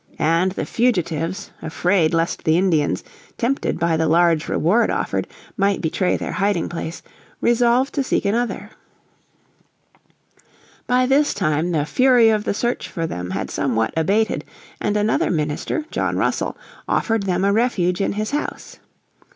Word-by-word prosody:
And 170 +4 +2
the - - -3
fugitives, 185 -5 -1
afraid 170 0 +1
lest 165 0 -1
the 160 +1 +3
Indians, 160 - +1 0.3
tempted 260 +4 -1
by 165 -1 +1
the 160 0 +1
large 165 0 +3
reward 205 +9 +2
offered, - - -1 0.3
might 200 0 +2
betray 180 +3 0
their - - -4
hiding 195 -3 0
place, 165 -1 -6 0.4
resolved 240 +3 +2
to 280 - 0
seek - - -1
another. 230 +4 -1 2.2
By 250 +1 +3
this 280 +3 +2
time 160 -1 0
the 150 -4 0
fury 245 - +4
of 215 -1 0
the - - 0
search 240 +3 -1
for 165 - -3
them 90 - -5
had 95 +1 -4
somewhat 115 -5 0
abated 200 +8 +1 0.4
and 210 0 0
another 210 +1 +1
minister, 155 - -2
John - - -1
Russell, - - -1 0.3
offered 225 -3 0
them 185 +1 +1
a 200 - +3
refuge 200 -6 +1
in 195 - 0
his 215 +3 -3
house. 295 +1 -4
185 Hz, 145 wpm, -21 LUFS, 160-225 Hz, 2.2 s, fury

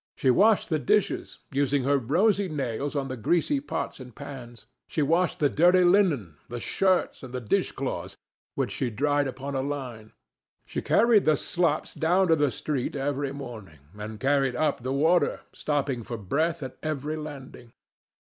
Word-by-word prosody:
She 130 - +3
washed 210 - +4
the 155 - +2
dishes, 210 +5 0
using 140 -1 +1
her 140 +1 +3
rosy 190 - +2
nails 140 -1 -3
on 140 -2 -1
the 130 - -4
greasy 175 - +1
pots 280 - -4
and 125 -3 -11
pans. 125 -5 -9 0.2
She 155 - 0
washed 165 +4 +2
the 145 - +3
dirty 180 +5 +4
linen, 170 - +3
the 120 0 -5
shirts, 185 +8 +1
and 130 -1 -8
the - - -1
dish 110 -4 0
cloths, - - -4 0.4
which - - -1
she 130 - -2
dried 145 +5 +1
upon 135 +2 -5
a 135 - 0
line; 130 -6 -5 0.5
she - - -4
carried 225 -2 +4
the 155 -1 +4
slops 170 -2 0
down 180 +3 +2
to 165 - +6
the 145 -2 +2
street 145 -2 -3
every 140 0 -1
morning, 115 - -9 0.2
and 105 +1 -7
carried 135 -2 +2
up 145 -2 0
the 130 +2 -3
water, 160 +6 +2
stopping 140 -4 -1
for 115 +1 -6
breath 155 - -1
at 130 - -7
every 155 0 -3
landing. 140 -6 -9
145 Hz, 170 wpm, -27 LUFS, 130-160 Hz, 0.5 s, to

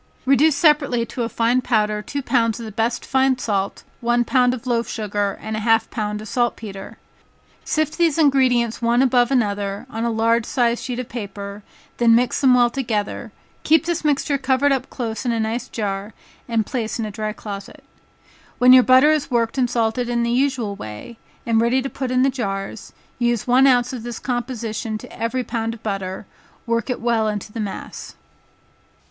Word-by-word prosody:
Reduce 275 +3 +4
separately 285 -6 +3
to 245 - -6
a 230 - -1
fine 235 +3 +1
powder 210 -3 0
two 280 +6 -5
pounds 230 -2 +1
of 230 - -6
the 220 - -7
best 230 +3 -1
fine 265 -1 +2
salt, 200 -5 -2 0.2
one 240 0 +1
pound 250 0 +3
of 250 - -11
loaf 235 -2 0
sugar 205 -2 -2
and 220 - -5
half 225 +1 +2
a - - -34
pound 210 -1 -3
of - - -9
saltpetre. 220 -4 -3 0.7
Sift 310 +1 -1
these 335 -3 +3
ingredients 255 -7 +2
one 240 +2 +3
above 245 -2 +3
another, 205 -4 -1
on 225 +1 -3
a 235 - +1
large 230 0 +1
sized 240 -3 +1
sheet 250 -2 -4
of 250 -1 -4
paper, 200 -2 -7 0.4
then 230 -1 +5
mix 245 +1 +1
them 260 -3 +5
well 240 -1 +4
together, 230 -6 -3 0.3
keep 320 +2 +3
this 340 -1 -2
mixture 285 -1 +1
covered 265 +1 +2
up 265 -1 -1
close 225 -4 -4
in 245 - 0
a 230 - -1
nice 225 +3 -2
jar, 200 -1 -4 0.3
and 225 -2 +1
placed 230 -3 -3
in 225 - -2
a 210 - -5
dry 215 +1 -3
closet. 200 -2 -8 0.7
When 250 +1 +7
your 255 - +9
butter 255 +5 +6
is 305 -2 0
worked 235 +1 0
and 250 -2 +2
salted 235 +1 0
in 240 -1 0
the 235 - 0
usual 250 -5 0
way, 110 - -9 0.3
and 225 -1 +2
ready 235 +3 +2
to 270 +1 -3
put 260 -2 -4
in 255 0 +2
the 270 - +3
jars, 195 -4 -4 0.3
use 240 -2 0
one 255 +2 +5
ounce 250 -1 +3
of 250 - -5
this 240 0 -6
composition 235 -3 -3
to - - -12
every 250 +3 -2
pound 230 -1 -3
of 225 - -18
butter, 195 -2 -4 0.4
work 230 +1 -1
it 250 - -2
well 230 -2 +1
into 210 0 -4
the 230 - -5
mass. 205 -3 -6
235 Hz, 190 wpm, -21 LUFS, 220-255 Hz, 0.7 s, your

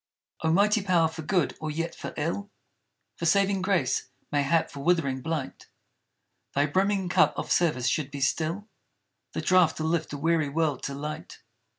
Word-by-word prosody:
O 160 - +1
mighty 210 +5 +3
power 180 -4 +3
for 160 0 -7
good 170 +2 0
or 155 - -3
yet 165 +2 -3
for - - -7
ill; 170 +7 -2 0.7
For 170 - -1
saving 195 +3 +3
grace; 175 -12 +1 0.2
mayhap 145 +3 +1
for 140 - -9
withering 140 -4 +1
blight! 155 -2 -4 0.9
Thy 140 +1 +3
brimming 190 +5 +1
cup 175 - +3
of - - -4
service 150 -8 +2
should 145 +3 0
be 140 0 -7
still 165 +9 -1 0.7
The - - -2
draught 180 -3 +4
to 155 - -3
lift 160 0 0
a 145 - -4
weary 160 0 +1
world 150 -2 0
to 140 - -4
light. 150 +2 -7
160 Hz, 170 wpm, -27 LUFS, 145-180 Hz, 0.9 s, draught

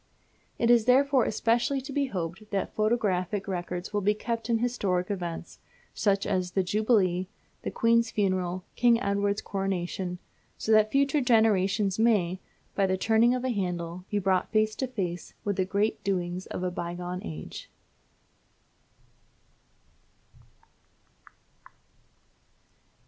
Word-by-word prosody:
It 235 0 +3
is 235 -2 +5
therefore 265 0 +4
especially 235 +5 +1
to 275 +1 -8
be 280 0 +1
hoped 190 0 -5
that 195 -1 -2
photographic 205 -3 0
records 180 0 -4
will 205 - +1
be 210 +2 +2
kept 230 +1 -4
of 230 - +3
historic 205 -6 -1
events, 175 -4 -5 0.3
such 200 -2 +1
as 185 -3 -1
the 190 - +2
Jubilee, 190 -3 +2 0.3
the - - -3
Queen's 230 0 +2
Funeral, 185 -3 -1
King 235 -1 +4
Edward's 200 -1 0
Coronation, 185 -2 -3 0.4
so 220 - -2
that 215 0 +5
future 280 +1 +2
generations 210 -4 +2
may, 195 -6 +2 0.3
by 195 -1 +2
the 190 0 0
turning 225 +4 +3
of 250 - -3
a - - 0
handle, 180 -4 -3
be 205 - 0
brought 190 -2 +1
face 215 0 +2
to 260 - -1
face 185 -8 -4
with 200 -1 -1
the 185 - +2
great 200 +3 0
doings 180 -2 -2
of 180 - -5
a 180 - -1
bygone 175 +1 -4
age. 80 -1 -8
200 Hz, 130 wpm, -28 LUFS, 180-230 Hz, 0.4 s, is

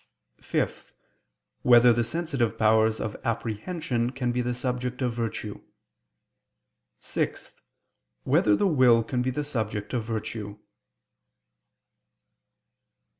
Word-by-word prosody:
(5) - - -3 0.7
Whether 120 0 +7
the 120 +1 +1
sensitive 135 -6 -1
powers 110 0 +3
of 110 - -4
apprehension 115 - -2
can 125 -2 -2
be 125 +1 0
the 120 0 -2
subject 125 0 -3
of 125 -2 0
virtue? 115 -3 -4 1.4
(6) - - -3 0.7
Whether 105 -1 +3
the - - +1
will 130 -9 +5
can 125 +2 -2
be 125 - 0
the 145 +4 -2
subject 110 -7 -3
of 120 -3 0
virtue? 110 -2 -5
120 Hz, 105 wpm, -26 LUFS, 110-125 Hz, 1.4 s, Whether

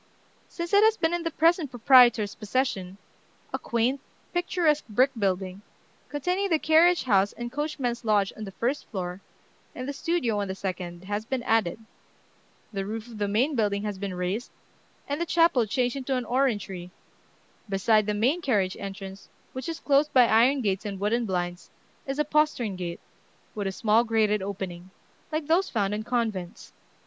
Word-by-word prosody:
Since 340 +2 -6
it 405 +1 +7
has 440 0 +4
been 325 0 +1
in 345 - 0
the 330 - -1
present 330 -1 +2
proprietor's 240 -4 +5
possession, 210 -4 -2 0.6
a - - -1
quaint, 235 +4 0 0.3
picturesque 345 -5 +1
brick 255 +6 +3
building, 190 -2 -1 0.5
containing 360 +7 -1
the 325 - +3
carriage 330 +3 +4
house 200 -4 +2
and 240 0 -6
coachman's 270 -4 -2
lodge 205 -3 +2
on 215 - -6
the 195 - -8
first 255 +8 -2
floor, 180 -2 -5 0.5
and 255 - -5
the 285 - -3
studio 280 -9 0
on 200 - -2
the 190 - -4
second, 180 -2 -5
has 205 +2 -3
been 255 +1 -3
added; 225 -7 +1 1.0
the 195 -1 -2
roof 215 +2 -5
of 225 -2 -10
the 205 - 0
main 240 +9 +1
building 205 -3 0
has 205 -2 -4
been 195 -2 -4
raised, 180 +6 -2 0.6
and 285 +3 -2
the - - +1
chapel 330 -9 +3
changed 245 +3 0
into 270 -1 -2
an 250 -1 -2
orangery: 210 -8 -1 0.8
beside 210 +2 +2
the 210 - 0
main 260 +12 +1
carriage 205 - +1
entrance, 195 0 -8 0.2
which 260 +6 -5
is 330 - -4
closed 290 +1 +2
by 250 -2 +7
iron 245 +5 +4
gates 195 -4 -1
and 200 -2 -5
wooden 225 +3 0
blinds, 175 -1 -3 0.4
is 270 +1 -3
a 300 - +1
postern 300 -9 +1
gate, 175 -2 -5 0.5
with 205 -2 -3
a - - -1
small 220 +3 +3
grated 215 -3 +1
opening, 185 -2 -6 0.4
like 310 0 -2
those 340 +5 +2
found 205 -3 0
in 210 - -2
convents. 220 -4 -3
225 Hz, 175 wpm, -26 LUFS, 200-280 Hz, 1.0 s, it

